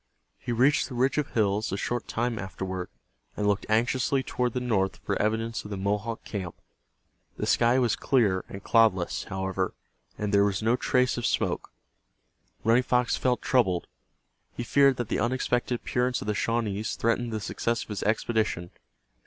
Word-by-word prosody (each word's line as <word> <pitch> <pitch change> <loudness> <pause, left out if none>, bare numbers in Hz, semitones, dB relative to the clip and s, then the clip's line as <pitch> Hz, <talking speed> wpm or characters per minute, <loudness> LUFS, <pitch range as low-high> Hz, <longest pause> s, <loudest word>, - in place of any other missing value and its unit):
He 125 - -4
reached 130 +5 +3
the 125 - -7
ridge 130 +4 +2
of 150 - -1
hills 105 -1 +1
a 100 - -1
short 120 +3 -2
time 115 -1 -1
afterward, 95 -1 -5 0.5
and 105 - -1
looked 100 -1 +1
anxiously 120 +4 +2
toward 125 -2 -1
the 125 - -1
north 110 -6 0
for - - -1
evidence 110 +1 -1
of 105 - -9
the 100 - -4
Mohawk 105 +4 -2
camp. 95 -5 -5 0.8
The - - -2
sky 120 +2 +3
was 120 -4 +2
clear 105 -9 +2
and 100 - -8
cloudless, 110 -6 +2
however, 95 0 -2 0.4
and 105 -1 -2
there 100 0 +6
was 100 0 0
no 115 +2 +3
trace 125 -1 +1
of 120 - -3
smoke. - - -1 0.9
Running 115 +3 +4
Fox 125 -1 +1
felt 125 -1 0
troubled. 95 -9 +2 0.7
He 120 - -4
feared 140 +2 +4
that 120 - -2
the - - 0
unexpected 120 +1 0
appearance 125 +1 -1
of - - -7
the 105 - 0
Shawnees 110 -1 -1
threatened 115 +1 0
the 110 - -2
success 115 +3 -2
of - - -18
his 105 -2 -4
expedition. 110 -5 0
115 Hz, 170 wpm, -27 LUFS, 100-125 Hz, 0.9 s, there